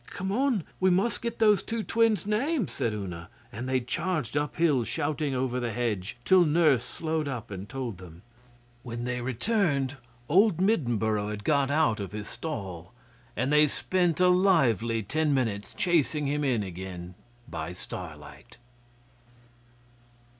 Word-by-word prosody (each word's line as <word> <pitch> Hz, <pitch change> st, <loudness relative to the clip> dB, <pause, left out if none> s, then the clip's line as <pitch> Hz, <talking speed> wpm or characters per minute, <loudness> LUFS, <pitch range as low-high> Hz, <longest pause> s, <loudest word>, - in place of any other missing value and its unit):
'Come 190 Hz, +1 st, -4 dB
on! 245 Hz, -, +1 dB, 0.2 s
We 185 Hz, -, +4 dB
must 190 Hz, +6 st, +1 dB
get 235 Hz, 0 st, -3 dB
those 210 Hz, -3 st, +4 dB
two 225 Hz, -1 st, -3 dB
twins' 225 Hz, -2 st, +2 dB
names,' 235 Hz, -, 0 dB
said 115 Hz, -, -1 dB
Una, 90 Hz, -5 st, -6 dB, 0.2 s
and 120 Hz, +5 st, -5 dB
they 130 Hz, 0 st, +2 dB
charged 150 Hz, +2 st, -2 dB
uphill 145 Hz, -2 st, +2 dB
shouting 145 Hz, +1 st, -2 dB
over 125 Hz, -1 st, -1 dB
the 120 Hz, -2 st, -2 dB
hedge, 110 Hz, -3 st, -2 dB
till 185 Hz, +3 st, +6 dB
Nurse 150 Hz, -6 st, +3 dB
slowed 160 Hz, +2 st, -2 dB
up 120 Hz, -5 st, -5 dB
and 95 Hz, +1 st, -7 dB
told 125 Hz, -8 st, -5 dB
them. 85 Hz, 0 st, -13 dB, 0.6 s
When 120 Hz, -1 st, -6 dB
they 125 Hz, 0 st, -2 dB
returned, 140 Hz, -, 0 dB, 0.3 s
old 195 Hz, +2 st, +4 dB
Middenboro 115 Hz, -, +1 dB
had 105 Hz, -1 st, -5 dB
got 140 Hz, 0 st, +2 dB
out 145 Hz, -7 st, +2 dB
of 100 Hz, 0 st, -5 dB
his 105 Hz, -1 st, -5 dB
stall, 95 Hz, -, -6 dB, 0.4 s
and 130 Hz, +5 st, 0 dB
they 150 Hz, 0 st, +6 dB
spent 175 Hz, +2 st, 0 dB
a 180 Hz, -, +5 dB
lively 125 Hz, -, +3 dB
ten 155 Hz, +6 st, +1 dB
minutes 105 Hz, -6 st, -1 dB
chasing 155 Hz, -4 st, +1 dB
him 145 Hz, +1 st, 0 dB
in 125 Hz, -6 st, +1 dB
again 90 Hz, -1 st, -7 dB, 0.3 s
by 80 Hz, -9 st, -5 dB
starlight. 80 Hz, -4 st, -9 dB
135 Hz, 145 wpm, -28 LUFS, 110-175 Hz, 0.6 s, till